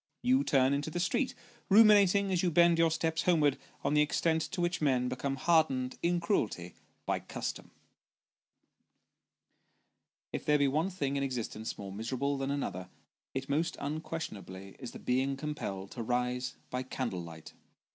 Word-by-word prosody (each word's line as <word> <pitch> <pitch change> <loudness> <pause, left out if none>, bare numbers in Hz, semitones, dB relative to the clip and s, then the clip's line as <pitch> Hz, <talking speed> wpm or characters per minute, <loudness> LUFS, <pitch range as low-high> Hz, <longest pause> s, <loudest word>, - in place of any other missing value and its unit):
You 260 +3 +4
turn 135 - +3
into 145 +2 -1
the 175 - -3
street, 220 +10 0 0.3
ruminating 200 -2 +6
as 180 -2 +2
you 180 - +2
bend 170 0 +5
your 165 0 +5
steps 160 0 0
homewards 155 -6 +3 0.3
on - - +1
the 150 - +5
extent 160 +2 +1
to 170 - -4
which 175 -1 0
men 130 -4 +2
become 135 +2 -2
hardened 135 -4 +2
in 175 0 +1
cruelty, 105 - -1 0.3
by - - 0
custom. - - -5 2.6
If - - -3
there 150 0 +3
be 140 -1 +3
one 155 +7 +1
thing 140 -7 -2
in - - -1
existence 120 -4 -3
more 100 -1 -7
miserable 130 +7 -2
than 135 0 -2
another, 95 -10 -3 0.5
it 135 0 -3
most 155 +4 0
unquestionably 105 - -5
is 125 - -6
the - - -9
being 130 +2 0
compelled 100 -10 -5
to 120 - -6
rise 125 +2 -1 0.2
by 125 - -1
candle 125 -7 -3
light. 80 -2 -10
140 Hz, 155 wpm, -31 LUFS, 125-165 Hz, 2.6 s, ruminating